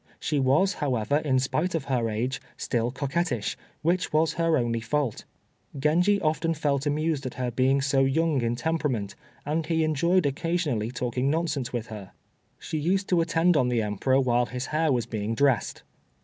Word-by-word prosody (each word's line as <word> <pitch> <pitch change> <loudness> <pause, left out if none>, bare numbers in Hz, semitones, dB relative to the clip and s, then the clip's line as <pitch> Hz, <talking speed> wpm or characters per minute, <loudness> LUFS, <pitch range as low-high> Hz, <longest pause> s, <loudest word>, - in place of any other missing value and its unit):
She 150 -2 -1
was, 140 +10 +3
however, 130 - 0
in 145 -4 +1
spite 155 +7 0
of 160 - -1
her 120 -4 0
age, 120 +5 -2 0.2
still 120 -1 -1
coquettish, 140 - -2 0.3
which 175 +3 +1
was 155 +1 +2
her 165 -1 +2
only 115 -1 0
fault. 125 +1 -2 0.5
Genji 175 +8 +3
often 165 0 0
felt 145 -2 0
amused 150 -1 0
at 125 - -7
her 125 -1 -2
being 130 +3 +2
so 135 -1 +2
young 150 0 +1
in 120 0 0
temperament, 125 -7 -1 0.3
and 155 +3 0
he 160 -1 +1
enjoyed 170 +3 +2
occasionally 145 -6 -1
talking 125 +1 -1
nonsense 155 -5 -1
with 120 -1 -4
her. 105 -4 -9 0.4
She 155 - -4
used 190 +5 0
to 175 -2 +3
attend 165 +1 +2
on 125 -4 +3
the 120 -2 +1
Emperor 105 +6 +1
while 120 -2 +2
his 125 +1 -4
hair 155 0 +2
was 120 -3 +1
being 110 -1 -3
dressed. 135 -2 +1
140 Hz, 175 wpm, -26 LUFS, 125-160 Hz, 0.5 s, was